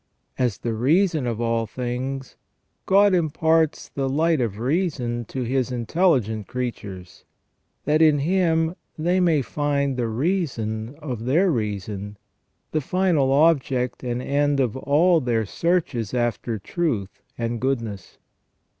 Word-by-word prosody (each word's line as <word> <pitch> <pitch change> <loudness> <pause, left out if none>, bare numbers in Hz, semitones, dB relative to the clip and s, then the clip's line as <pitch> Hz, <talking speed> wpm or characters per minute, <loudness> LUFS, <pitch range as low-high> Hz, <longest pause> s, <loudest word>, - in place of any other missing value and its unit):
As 125 -5 +1
the 115 - -3
reason 155 - +2
of 115 -2 -2
all 115 -1 0
things, 130 +3 -4 0.5
God 200 +1 +5
imparts 160 -1 +1
the 135 -1 -3
light 160 +1 +2
of 110 -4 -2
reason 125 - -1
to 130 +4 -4
His 130 +1 0
intelligent 120 - +1
creatures, 100 -8 -6 0.6
that 150 +2 +3
in 155 -2 +6
Him 165 +1 +1 0.2
they 175 +4 +1
may 165 -6 +3
find 140 -1 -1
the 120 -2 0
reason 120 - -2
of 130 -7 -6
their 170 +9 +3
reason, 105 - -3 0.5
the 155 - 0
final 165 -4 +1
object 135 -5 +2
and 125 0 -2
end 145 +1 +1
of 125 -5 +1
all 160 +6 +3
their 115 -3 0
searches 140 - -1
after 120 -2 -1
truth 110 - -3 0.2
and 115 0 -2
goodness. 115 -7 -3
130 Hz, 130 wpm, -23 LUFS, 115-160 Hz, 0.6 s, in